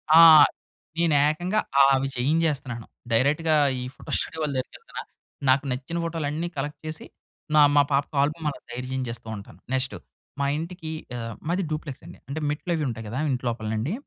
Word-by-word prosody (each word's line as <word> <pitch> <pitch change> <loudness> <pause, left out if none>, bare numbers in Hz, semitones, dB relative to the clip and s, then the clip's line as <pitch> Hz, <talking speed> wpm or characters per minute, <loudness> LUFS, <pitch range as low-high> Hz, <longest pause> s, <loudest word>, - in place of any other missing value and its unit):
ఆ! - - +10 0.8
నేనేకంగా 165 +5 +2 0.3
ఆవి 135 0 +3
చేయించేస్తన్నాను. 135 -4 0 0.3
డైరెక్ట్‌గా 150 +7 +3 0.2
ఈ - - -5
ఫోటో - - -10
స్టూడియో 160 - -2
వాళ్ళ 150 -2 -1
దగ్గరికెళ్తన్నా, 460 - -6 0.5
నాకు 135 +2 +4
నచ్చిన 130 +6 -3
ఫోటోలన్నీ 165 0 -2
కలక్ట్ 145 +1 -3
చేసి, 155 0 -5 0.5
నా 150 - +8
మా 145 - +8
పాపకు 140 +2 0
ఆల్బమ్మలా 150 0 -1
తయారు 125 +1 -5
చేయించేస్తూ 120 -3 -4
ఉంటాను. 100 -4 -12
నెక్స్ట్ 130 0 +1 0.5
మా 140 - +1
ఇంటికి 165 0 -6 0.3
ఆహ్, 115 -1 -5
మాది 180 +3 +1
డూప్లెక్సండి. 150 -3 -6
అంటే 145 +3 -3
మెట్లవి 160 +1 -2
ఉంటాయి 110 -2 -5
గదా 120 +5 -4
ఇంట్లోపలనండి, 115 - -2
145 Hz, 140 wpm, -25 LUFS, 125-160 Hz, 0.8 s, ఆ